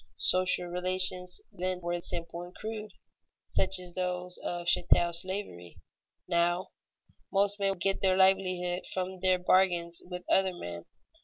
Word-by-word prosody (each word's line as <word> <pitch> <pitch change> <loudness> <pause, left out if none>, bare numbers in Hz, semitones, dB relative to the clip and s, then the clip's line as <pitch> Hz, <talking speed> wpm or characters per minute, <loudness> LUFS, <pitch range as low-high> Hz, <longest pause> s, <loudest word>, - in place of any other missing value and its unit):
Social 185 -1 +3
relations 180 0 0
then 185 0 -3
were 175 0 -3
simple 170 0 -4
and 175 +1 -11
crude, 215 -1 -6 0.6
such 190 - +3
as 180 -1 -5
those 180 0 -3
of 175 0 -4
chattel 175 0 +3
slavery. 170 - -2 0.5
Now, 175 +1 +1 0.6
most 200 +1 +2
men 195 -1 0
get 195 +2 +1
their 185 -1 +3
livelihood 185 -2 +2
from 185 0 -4
their 185 0 +3
bargains 180 -2 +2
with 180 0 -8
other 190 -1 +3
men. 85 - -7
180 Hz, 135 wpm, -29 LUFS, 175-190 Hz, 0.6 s, Social